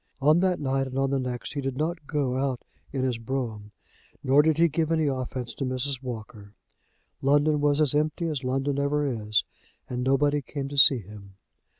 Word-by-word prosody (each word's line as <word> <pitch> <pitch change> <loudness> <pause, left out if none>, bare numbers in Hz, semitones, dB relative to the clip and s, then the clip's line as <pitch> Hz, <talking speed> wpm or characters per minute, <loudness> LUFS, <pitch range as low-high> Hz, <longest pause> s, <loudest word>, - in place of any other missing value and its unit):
On 150 +4 +4
that 185 -1 +1
night 135 -1 0
and 130 0 -6
on 135 0 +1
the 135 - +1
next 125 -2 -4
he 145 - -3
did 135 -1 -3
not 155 0 -3
go 140 -5 -1
out 130 -2 -2 0.3
in 135 -2 -2
his 125 -3 -1
brougham, 115 -4 -4 0.5
nor 135 +3 +5
did 155 0 +2
he 170 +1 +5
give 160 +1 -1
any 160 -1 +2
offence 130 -2 -3
to - - -5
Mrs. 130 +1 -2
Walker. 110 -4 -8 0.7
London 145 +2 +3
was 145 0 +2
as 150 -3 +5
empty 155 +3 0
as 150 -5 -2
London 135 +2 -1
ever 145 +1 0
is, 110 -5 0 0.4
and 125 0 -3
nobody 145 +2 +2
came 135 +1 -5
to 145 - -7
see 135 -3 +7
him. 100 -1 -13
135 Hz, 195 wpm, -26 LUFS, 125-145 Hz, 0.7 s, see